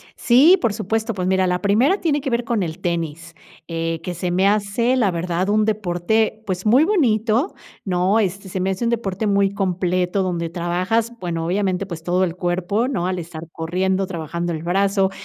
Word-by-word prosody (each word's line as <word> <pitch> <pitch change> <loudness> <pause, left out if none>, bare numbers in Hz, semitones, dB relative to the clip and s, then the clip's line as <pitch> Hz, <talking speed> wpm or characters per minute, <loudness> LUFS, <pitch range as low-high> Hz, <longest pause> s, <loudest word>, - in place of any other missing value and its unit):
Sí, 290 +10 +6
por 230 -4 +1
supuesto. 220 +2 -2
Pues, 185 -1 -2
mira, 190 -1 +2
la 180 0 0
primera 235 - +3
tiene 295 -4 +1
que 270 - -3
ver 235 0 0
con 225 -4 -1
el 165 +2 -5
tenis, 170 -2 -3 0.3
eh, 165 -1 -2
que 180 - -4
se 175 +1 -3
me 190 +2 +3
hace, 210 +5 +1
la 215 -7 +2
verdad, 175 +2 -1
un 215 0 +3
deporte, 215 +2 0
pues, 185 0 -3
muy 250 +8 +5
bonito, 250 - +1 0.3
¿no?, 185 +4 +2
este, 195 -1 -2
se 185 - -3
me 190 +1 0
hace 190 +5 -3
un - - +2
deporte 215 -3 -2
muy 200 -1 +2
completo 185 0 0
donde 170 -2 -2
trabajas, 185 +7 -1
bueno, 165 -2 -3
obviamente, 190 +1 0
pues, 170 -4 -8
todo 180 +2 +1
el 175 -1 -1
cuerpo, 185 +6 -1
¿no? 185 -10 -1
Al 185 -1 -2
estar 165 -1 -8
corriendo, 185 +3 -1
trabajando 170 0 -4
el 160 0 -5
brazo. 195 +2 +2
190 Hz, 195 wpm, -21 LUFS, 175-215 Hz, 0.3 s, Sí